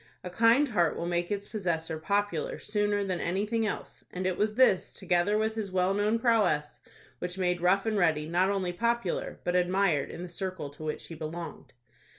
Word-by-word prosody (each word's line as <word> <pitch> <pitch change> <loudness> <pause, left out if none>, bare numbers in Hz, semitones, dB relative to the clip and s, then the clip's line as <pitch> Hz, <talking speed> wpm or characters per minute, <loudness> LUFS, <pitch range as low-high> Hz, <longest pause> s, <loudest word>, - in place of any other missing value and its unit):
A 180 - -6
kind 230 +8 +4
heart 175 -8 +1
will 170 - -3
make 175 0 -1
its 205 0 -3
possessor 165 -6 -2
popular 200 -2 -1
sooner 205 -1 0
than 185 -3 -2
anything 210 +5 0
else, - - -6
and 185 +1 -4
it 185 -1 +1
was 210 +1 0
this, 250 -7 +3
together 180 +4 +1
with 220 0 0
his 215 -3 -4
well 185 +1 +2
known 210 +3 +1
prowess, 215 -11 +1 0.4
which 180 +1 -4
made 180 -2 0
Rough 190 +3 +3
and 215 -2 +1
Ready 155 -4 +2
not 180 +3 +2
only 190 -3 -1
popular, 235 -1 -1
but 175 - 0
admired 180 -4 +2
in 175 - -7
the - - -5
circle 180 -4 -5
to 145 +2 -11
which 155 -1 -4
he - - -9
belonged. 165 +2 -7
185 Hz, 190 wpm, -29 LUFS, 175-210 Hz, 0.4 s, kind